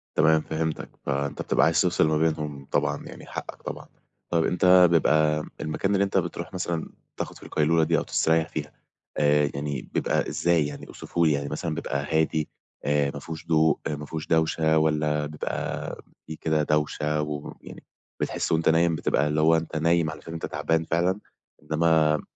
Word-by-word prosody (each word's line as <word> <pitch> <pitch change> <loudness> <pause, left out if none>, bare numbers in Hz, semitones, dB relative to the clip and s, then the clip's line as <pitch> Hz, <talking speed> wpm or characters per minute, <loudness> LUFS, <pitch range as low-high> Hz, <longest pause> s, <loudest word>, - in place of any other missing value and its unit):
تمام 80 0 +4
فهمتك، 80 0 -3 0.2
فأنت 70 0 -2
بتبقى 75 - +2
عايز 80 0 +3
تفصل 85 -3 +2
ما 80 0 +2
بينهم 75 -3 -1
طبعًا - - 0
يعني - - -10
حقك - - -7
طبعًا، - - -7 0.4
طيب 85 -1 +2
أنت 90 0 +6
بيبقى 75 -2 +3 0.2
المكان 95 +6 -1
اللي 100 0 +3
أنت 95 -1 0
بتروح 85 0 -3
مثلًا 85 -3 -3 0.3
تاخُد - - -5
فيه - - -14
القيلولة 80 +1 +2
دي 85 +1 +2
أو - - 0
تستريّح 80 0 +1
فيها، 75 -1 -5 0.4
آآ 75 -1 +3
يعني 70 -2 -3
بيبقى - - 0
إزاي 85 -4 +2
يعني 70 - -8
أوصفه 85 -1 -2
لي، 80 - +4
يعني 70 0 -1
مثلًا 80 -2 -3
بيبقى 70 -3 -3
هادي 80 -1 0 0.4
آآ 75 -1 +2
ما 70 - -6
فيهوش 80 +2 -8
ضوء 80 -1 +3
ما 75 0 -4
فيهوش 80 0 -6
دوشة، 80 -1 +2
والّا 75 -1 +1
بيبقى 75 +1 -4 0.3
في 80 - -6
كده 80 -1 0
دوشة 75 0 0
ويعني 75 -1 -7 0.4
بتحِس - - -1
وأنت 80 0 +3
نايم 80 0 +3
بتبقى 75 -1 +1
اللي 75 +1 +1
هو 80 +1 +5
أنت 80 0 -3
نايم 85 0 +2
علشان 80 - -8
أنت 80 - -4
تعبان 80 0 0
فعلًا، 90 +4 +1 0.4
إنما 80 -1 +2
80 Hz, 170 wpm, -26 LUFS, 75-80 Hz, 0.4 s, أنت